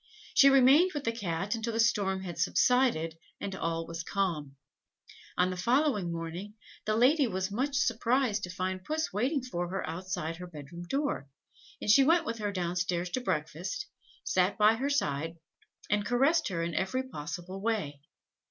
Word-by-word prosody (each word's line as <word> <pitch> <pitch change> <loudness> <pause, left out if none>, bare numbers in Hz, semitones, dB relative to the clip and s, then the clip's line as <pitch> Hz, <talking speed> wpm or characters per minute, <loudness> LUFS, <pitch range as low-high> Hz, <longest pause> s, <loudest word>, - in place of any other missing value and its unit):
She 275 - +7
remained 275 +7 +6
with 290 - -2
the 230 - +1
Cat 195 -2 -2
until 230 0 -3
the 225 - -1
storm 200 -5 +2
had 175 -3 -6
subsided, 180 -5 +2 0.2
and 195 - -4
all 165 -2 -2
was 165 0 -5
calm. 160 -8 -2 0.8
On 180 +1 +3
the - - -3
following 235 - +1
morning, 170 +5 -5 0.3
the 215 - +1
lady 265 +5 +4
was 190 -2 -2
much 270 +7 -1
surprised 235 -3 +1
to - - -10
find 185 +1 -3
Puss 310 +2 -2
waiting 255 +7 0
for 175 -8 -3
her 195 +1 -3
outside 165 -1 -4
her 180 0 -8
bed 150 -4 -10
room 175 0 -7
door, 275 - -1 0.5
and - - -6
she 270 +6 +7
went 330 +3 +4
with 230 -4 -3
her 205 -1 -1
down 180 -2 -2
stairs 175 0 -1
to 255 - -1
breakfast, 185 - -3 0.4
sat 185 +1 +1
by 215 +1 +6
her 265 +5 -1
side, 165 - -1 0.5
and 210 0 +1
caressed 275 +9 +2
her 170 -3 -2
in 170 0 -3
every 190 +10 -1
possible 180 - -6
way. 175 -11 -2
195 Hz, 175 wpm, -30 LUFS, 175-250 Hz, 0.8 s, She